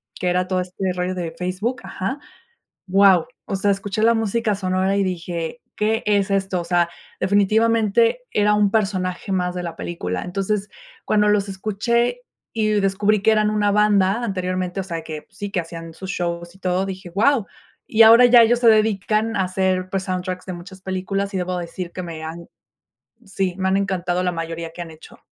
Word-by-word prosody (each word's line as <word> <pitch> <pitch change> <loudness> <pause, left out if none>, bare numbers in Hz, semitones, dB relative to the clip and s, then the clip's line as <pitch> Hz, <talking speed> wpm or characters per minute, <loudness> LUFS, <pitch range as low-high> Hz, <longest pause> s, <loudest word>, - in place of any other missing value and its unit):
que 180 - -1
era 180 +1 +1
todo 185 -1 0
este 185 +1 -3
rollo 180 +1 -2
de 170 -3 -4
Facebook. 185 +8 -2
Ajá. 195 +7 -4 0.7
Guau. 190 -2 +5 0.2
O 195 - -3
sea, 200 +1 +2
escuché 200 +2 -2
la 230 +1 +5
música 225 0 0
sonora 190 0 0
y 200 - +2
dije: 175 +2 -4
"¿Qué 220 +1 0
es 205 -1 +2
esto?" 190 -2 0
O - - -8
sea, 175 -1 +2 0.3
definitivamente, 220 - +3
era 210 0 +3
un 210 -1 +3
personaje 190 -3 -1
más 180 -1 -1
de 180 - -3
la 170 -1 -5
película, 90 - -4
entonces, 195 +3 -2 0.4
cuando 210 -1 +3
los 205 -1 +1
escuché 220 - 0 0.4
y 215 -1 +2
descubrí 200 +2 +2
que 220 - +5
eran 215 -1 +3
una 210 -1 +2
banda 205 +1 +3
anteriormente, 185 -2 -2
o - - -5
sea, 170 -3 -5
que 155 -1 -7
sí, 200 +1 -6
que 190 - 0
hacían 165 0 -9
sus 190 +3 -8
shows 170 -1 -4
y - - -19
todo, 185 0 0
dije: 190 -2 -7
"Guau", 220 +6 +2 0.4
y 220 - +3
ahora 230 +3 +8
ya 245 -1 +8
ellos 235 +1 +3
se 240 - +3
dedican 215 0 +2
a 190 - +2
hacer, 185 0 0
pues, 190 0 -2
soundtracks 185 0 -4
de 185 - -5
muchas 185 +2 -11
películas 195 +2 -3
y 190 - -1
debo 180 0 -2
decir 175 0 -5
que 185 - -5
me 165 -2 -7
han 165 +2 -7 0.8
sí, 195 -2 -2
me 190 0 0
han 190 - +2
encantado 180 -2 -1
la 180 - +1
mayoría 165 0 -5
que 175 - -8
han 165 - -11
hecho. 155 - -15
190 Hz, 190 wpm, -21 LUFS, 180-210 Hz, 0.8 s, ahora